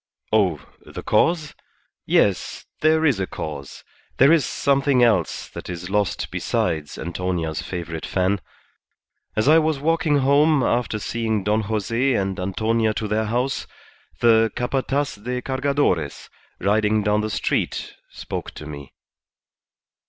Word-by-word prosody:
Oh, 95 -8 +3 0.2
the - - -9
cause? 165 -3 +2 0.5
Yes, 100 -3 +1
there 160 +1 +3
is 135 -10 +3
a 95 - -1
cause; 70 -3 -7 0.3
there 135 +4 +6
is 165 -4 +5
something 140 -2 +2
else 105 -8 +1
that - - -9
is 90 +1 -6
lost 105 -1 0
besides 75 -3 -1
Antonia's 85 -2 -3
favourite 85 -3 -5
fan. 95 +1 0 0.9
As 110 +4 +1
I 160 +2 +7
was 155 -2 +1
walking 160 0 +2
home 140 +1 +4
after 120 -2 0
seeing 110 -1 -2
Don 105 +2 +1
Jose 115 +5 0
and 95 -1 -1
Antonia 110 +4 0
to 110 - -2
their 110 +1 0
house, 125 +5 -1 0.5
the 115 -2 +5
Capataz 135 -2 -1
de 125 +1 -2
Cargadores, 130 - -1 0.3
riding 105 +2 +2
down 105 +1 +2
the 110 - -2
street, 105 - -1 0.2
spoke - - -6
to 75 - -8
me." 70 -2 -9
110 Hz, 130 wpm, -22 LUFS, 95-135 Hz, 0.9 s, I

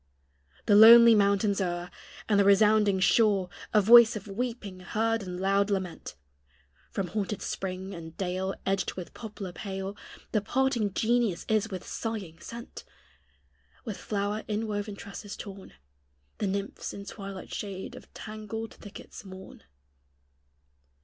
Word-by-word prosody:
The 205 - +3
lonely 230 +2 +10
mountains 200 -1 +2
o'er, 175 -1 -3 0.4
And 205 -2 +3
the - - +6
resounding 205 0 +4
shore, 195 -2 +3 0.2
A 210 - +5
voice 235 +2 +8
of 210 -1 -7
weeping 210 -2 -4
heard 225 +4 -1
and 180 -2 -6
loud 195 +2 +2
lament; 190 -3 -3 0.7
From 190 -3 -3
haunted 205 +1 -3
spring, 190 0 -4
and 165 -2 -9
dale 190 +1 -2
Edged 195 -1 -1
with 180 -3 -8
poplar 210 -5 -7
pale, 195 +1 -5 0.4
The 215 - +1
parting 245 -2 0
genius 230 -5 +1
is 220 0 +1
with 185 -3 -6
sighing 200 -8 -5
sent; 235 +6 -9 1.0
With 215 -4 -5
flower 205 +1 -2
inwoven 210 -1 -3
tresses 200 +1 -8
torn 195 -1 -9 0.7
The 205 - 0
nymphs 200 +1 -4
in 200 - -8
twilight 195 -2 -8
shade 195 -2 -5
of - - -14
tangled 215 +1 -6
thickets 205 - -11
mourn. 190 -1 -11
200 Hz, 130 wpm, -28 LUFS, 190-220 Hz, 1.0 s, lonely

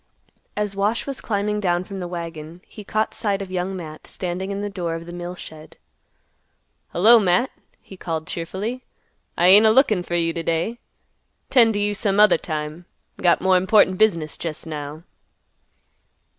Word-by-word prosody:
As 210 -1 -2
Wash 205 +4 0
was 275 -1 -5
climbing 210 0 -1
down 175 -3 0
from 195 +1 -8
the 180 - -4
wagon, 170 -1 -7
he 210 - -12
caught 215 +2 -1
sight 200 -3 -1
of 195 -2 -7
Young 185 +1 -2
Matt 155 -3 -9
standing 185 +1 -4
in 200 0 -3
the 205 - -2
door 175 -4 -3
of 165 0 -7
the 175 - -9
mill 175 +1 -6
shed. 155 -3 -11 1.1
"Hello, 225 +7 +6
Matt," 195 +5 +2 0.3
he 190 - -13
called 160 -3 -4
cheerfully; 200 +11 -5 0.5
"I 175 - +5
ain't 210 +3 +8
a - - +6
lookin' 220 -5 +4
fer 175 0 -4
you 165 -1 +1
t' 170 - -3
day; 170 +9 -2 0.7
'tend 230 -4 +5
t' 205 0 +1
you 205 - 0
some 205 -1 0
other 210 -6 +6
time. 155 +1 -5 0.3
Got 175 -2 +2
more 190 0 +4
important 185 0 +3
business 170 -8 +1
jest 160 -2 -5
now." 150 0 -7
185 Hz, 170 wpm, -22 LUFS, 170-205 Hz, 1.1 s, ain't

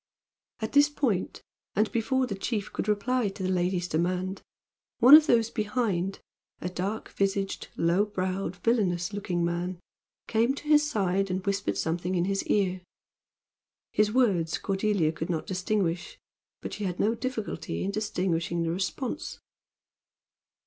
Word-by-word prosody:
At 220 - -2
this 290 +1 +5
point, 250 -10 -1 0.3
and 215 +2 +2
before 260 +3 +1
the 235 - -4
chief 200 +1 -3
could - - -3
reply 215 +2 +1
to 195 0 -7
the 185 - 0
lady's 180 0 0
demand, 180 +4 -1 0.6
one 255 +4 +8
of 305 0 +10
those 230 -3 +3
behind 210 -4 -1 0.4
a 180 - -3
dark 190 +4 -3
visaged, 195 0 -1
low 170 +5 +3
browed, 190 -2 -2
villainous 185 -4 0
looking 180 -4 -1
man 175 +1 -2 0.5
came 235 +4 +2
to - - -8
his 300 0 +5
side 195 -4 0
and 185 +1 -2
whispered 200 0 -1
something 175 +3 -1
in 175 0 +1
his 195 0 0
ear. 185 -3 +1 1.1
His 210 0 +3
words 200 -10 +2
Cordelia 195 -4 +1
could 160 +2 -5
not 165 -3 -1
distinguish, 185 -3 -1 0.5
but - - -5
she 210 - -4
had 180 -2 -3
no 220 +2 +3
difficulty 235 -3 -4
in 195 - -1
distinguishing 180 -5 -1
the 165 - 0
response. 215 - -3
195 Hz, 145 wpm, -28 LUFS, 180-220 Hz, 1.1 s, of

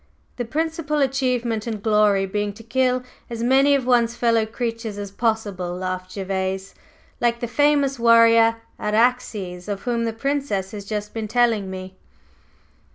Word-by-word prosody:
"The 245 - -2
principal 315 +3 -2
achievement 250 -5 0
and 215 -3 -4
glory 210 -3 +3
being 205 +1 -2
to 225 - -13
kill 255 +2 +1 0.3
as 230 -1 -4
many 270 +3 +4
of 265 -3 -1
one's 240 -2 +3
fellow 230 -2 +2
creatures 230 -2 -4
as 200 -1 -6
possible!" 200 -5 -2
laughed 185 0 -5
Gervase 190 0 -3 0.5
"Like 235 -1 +1
the 240 - -3
famous 285 0 +2
warrior, 230 -1 +6 0.2
Araxes, 210 -5 0
of 200 -1 -4
whom 235 -1 -1
the 225 - -1
Princess 230 -6 -2
has 205 -2 -7
just 210 0 -4
been 225 -1 -4
telling 225 -3 +2
me!" 185 0 -8
230 Hz, 150 wpm, -22 LUFS, 200-245 Hz, 0.5 s, warrior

